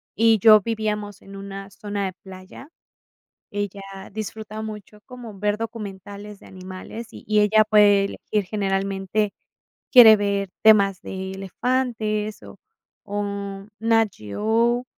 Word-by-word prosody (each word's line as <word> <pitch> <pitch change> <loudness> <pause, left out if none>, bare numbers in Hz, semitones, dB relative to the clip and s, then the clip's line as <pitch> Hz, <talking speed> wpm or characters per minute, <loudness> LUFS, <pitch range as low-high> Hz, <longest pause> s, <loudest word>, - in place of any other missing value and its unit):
y 225 0 +4
yo 215 +1 +7
vivíamos 210 -2 -3
en 195 0 -12
una 195 0 -8
zona 205 -1 -4
de 185 - -4
playa, 190 +7 -12 0.8
ella 205 -1 -4 0.3
disfruta 215 0 -6
mucho 210 -1 -8
como 240 -6 -10
ver 210 +1 0
documentales 205 -2 -7
de - - -17
animales, 185 +5 -9
y 215 0 -1
ella 210 +1 +5
puede 205 -2 +5
elegir, 210 0 -3
generalmente 195 0 -1 0.6
quiere 235 -4 +10
ver 200 -1 -1
temas 200 -4 +5
de 190 0 -6
elefantes, 215 +1 -2
o - - -12 0.5
o, 200 -1 -4
NAT 225 0 +3
GEO, 225 - 0
210 Hz, 120 wpm, -23 LUFS, 195-220 Hz, 0.8 s, quiere